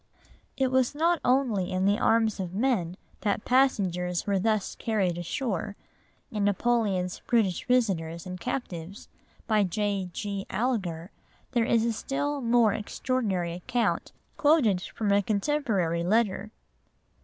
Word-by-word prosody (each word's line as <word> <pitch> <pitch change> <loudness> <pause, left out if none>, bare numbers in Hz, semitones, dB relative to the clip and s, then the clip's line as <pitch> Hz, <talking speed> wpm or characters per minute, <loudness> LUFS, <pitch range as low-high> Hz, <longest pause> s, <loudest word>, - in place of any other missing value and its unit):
It 265 -1 +1
was 260 +1 +2
not 335 +2 +2
only 245 -8 +1
in 185 +1 0
the 205 +2 +3
arms 225 -2 +2
of 185 -1 -4
men 200 -7 0 0.2
that 210 0 -1
passengers 185 -9 +1
were 200 -2 +1
thus 215 0 0
carried 200 -6 0
ashore, 200 +3 -3 0.6
in 210 -2 -1
Napoleon's 200 -3 +1
British 215 -7 +1
Visitors 175 -10 0
and 185 0 -6
Captives, 195 -6 -5 0.4
by 215 -2 +3
J. 195 0 -1
G. 200 +1 -4
Alger, 190 -7 -2 0.4
there 240 -3 +2
is 230 -1 +2
a 235 - +1
still 285 +4 -2
more 235 -3 +4
extraordinary 205 -6 -2
account 230 +7 -1 0.3
quoted 280 - +3
from 205 +1 -2
a 200 0 +4
contemporary 200 - 0
letter. 210 +1 +1
210 Hz, 130 wpm, -27 LUFS, 185-240 Hz, 0.6 s, more